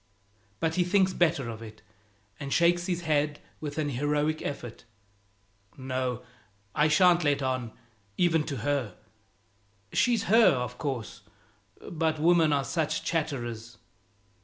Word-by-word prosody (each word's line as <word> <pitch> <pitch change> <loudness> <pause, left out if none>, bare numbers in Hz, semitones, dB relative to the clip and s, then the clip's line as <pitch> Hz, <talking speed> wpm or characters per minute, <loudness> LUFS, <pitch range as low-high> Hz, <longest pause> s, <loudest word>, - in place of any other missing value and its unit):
But 160 -1 0
he 180 - +2
thinks 190 +1 +2
better 145 -7 +1
of 115 -1 -7
it, 110 -1 -11 0.6
and 140 -1 -6
shakes 175 +2 +3
his 175 -2 -1
head 150 -2 0 0.2
with 145 -1 -6
an 150 -2 0
heroic 145 +3 0
effort. 120 -5 -6 0.9
"No 130 -2 -3 0.5
I 150 - +3
shan't 175 +2 +4
let 145 -2 +1
on, 130 -3 -2 0.5
even 165 -3 +3
to 140 - -4
her. 140 -7 -1 1.0
She's 235 -4 +2
her, 225 +2 +5
of 125 -1 -4
course, 130 -9 -4 0.7
but 160 -2 -1
women 165 0 +4
are 140 -1 +2
such 160 +1 -1
chatterers!" 120 -8 -3
150 Hz, 130 wpm, -28 LUFS, 130-170 Hz, 1.0 s, her